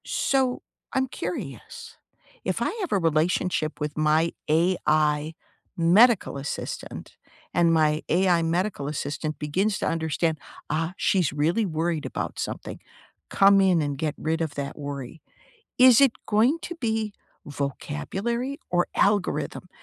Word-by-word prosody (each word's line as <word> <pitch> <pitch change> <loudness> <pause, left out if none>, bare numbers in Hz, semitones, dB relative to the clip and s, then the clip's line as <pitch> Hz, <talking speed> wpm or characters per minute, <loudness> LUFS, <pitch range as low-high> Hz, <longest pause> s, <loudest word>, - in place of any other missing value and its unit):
So, 260 -2 0 0.3
I'm 265 0 +1
curious, 455 - -7 0.5
if - - -2
I - - +1
have 365 - -3
a 205 - +3
relationship 165 -1 0
with 150 0 -4
my 155 +2 +2 0.2
AI 155 -2 +2 0.4
medical 190 - +4
assistant 140 +2 -6 0.4
and 170 0 +3
my 155 -1 +2
AI 175 0 +3
medical 170 -2 -1
assistant 150 +1 -3
begins 190 +8 0
to - - -1
understand, 160 -1 -1 0.3
"Ah, 160 +3 -1
she's 180 -6 +2
really 160 +10 +1
worried 165 -2 -1
about - - -4
something. - - -5 0.5
Come 195 0 +5
in 185 -4 +3
and 145 -2 -2
get 150 +1 -2
rid 160 +1 -1
of 160 -3 -3
that 140 -1 -5
worry." 140 0 -7 0.6
Is 255 0 +7
it 270 -4 +5
going 230 +9 +3
to 345 - -5
be 220 -7 -2 0.3
vocabulary 195 - -3
or 175 0 +1
algorithm 200 -2 0
165 Hz, 130 wpm, -25 LUFS, 150-205 Hz, 0.6 s, Is